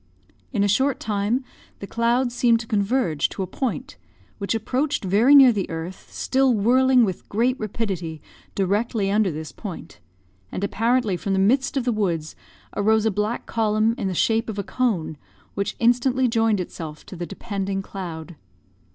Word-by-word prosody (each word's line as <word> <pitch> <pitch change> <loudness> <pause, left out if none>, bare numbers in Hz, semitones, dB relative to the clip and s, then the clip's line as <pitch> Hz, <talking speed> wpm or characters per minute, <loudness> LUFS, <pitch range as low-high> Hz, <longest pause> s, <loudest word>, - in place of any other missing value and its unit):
In 205 -5 +1
a - - +3
short 265 +6 +2
time, 215 +4 -1 0.3
the - - -7
clouds 235 +3 +1
seemed 235 -2 +3
to - - -8
converge 205 - +1
to 195 - -4
a - - -2
point, 240 +7 -4 0.4
which 200 +2 -1
approached 260 +6 -1
very 220 +10 +5
near 270 -3 +9
the 200 -3 -2
earth, 165 +3 -6
still 265 -2 +2
whirling 250 +3 +4
with 185 -4 -5
great 240 +5 +1
rapidity 190 -7 -3 0.4
directly 200 +1 0
under 210 -1 +3
this 155 -1 -6
point; 200 -6 -9 0.5
and 195 - -4
apparently 225 -1 +1
from 200 +1 -2
the - - +1
midst 260 +8 +2
of 265 - +1
the 245 - +2
woods 175 -8 -1 0.4
arose 220 +1 +2
a 220 - +3
black 210 +4 -2
column, 220 0 +1
in 220 -6 -3
the 185 - -2
shape 225 +5 +1
of 210 - -5
a 200 - -1
cone, 195 -11 -1 0.4
which 200 +1 -2
instantly 250 +2 +2
joined 225 -3 +2
itself 160 -3 -7
to - - -10
the 175 -1 -5
depending 195 -2 -4
cloud. 170 -4 -7
215 Hz, 170 wpm, -23 LUFS, 195-240 Hz, 0.5 s, near